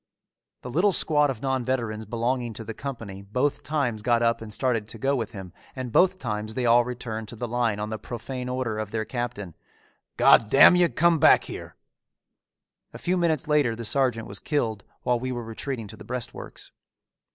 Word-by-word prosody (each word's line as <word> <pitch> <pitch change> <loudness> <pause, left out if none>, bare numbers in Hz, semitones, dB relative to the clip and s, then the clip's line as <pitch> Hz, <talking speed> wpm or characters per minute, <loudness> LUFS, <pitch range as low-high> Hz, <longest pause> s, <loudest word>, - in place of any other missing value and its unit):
The 125 - -6
little 180 +9 +3
squad 150 -4 +2
of 130 -2 -5
non 130 -2 0
veterans 115 -4 -2
belonging 120 +1 -1
to 115 - -5
the 110 +1 -6
company 115 -7 -7
both 125 +8 -1
times 130 -7 -1
got 120 +1 +2
up 115 0 +2
and 110 -1 -8
started 115 -2 0
to 115 - -7
go 135 +5 +1
with 115 -5 -3
him 95 -3 -9 0.2
and 130 -2 -5
both 185 +8 +4
times 110 -4 -3
they 125 - -1
all 120 +1 +6
returned 120 -3 -5
to 120 - -9
the 120 +2 -4
line 115 -3 0
on 105 +1 -4
the 110 - -4
profane 125 +2 -6
order 125 -4 -2
of 110 -2 -3
their 110 0 -2
captain, 120 -8 -5 0.6
"God 110 - +6
damn 140 - +8
you, 175 -1 +4
come 170 0 +3
back - - +6
here." - - -8 1.2
A - - -5
few 180 - 0
minutes 165 -6 +1
later 145 -7 +2
the 115 0 -6
sergeant 125 -2 +1
was 100 - -3
killed 115 -9 -1 0.2
while 125 -1 +1
we 130 +1 -3
were 120 -1 -4
retreating 115 +1 -5
to - - -8
the - - -11
breastworks. 125 -1 -6
120 Hz, 195 wpm, -25 LUFS, 110-135 Hz, 1.2 s, damn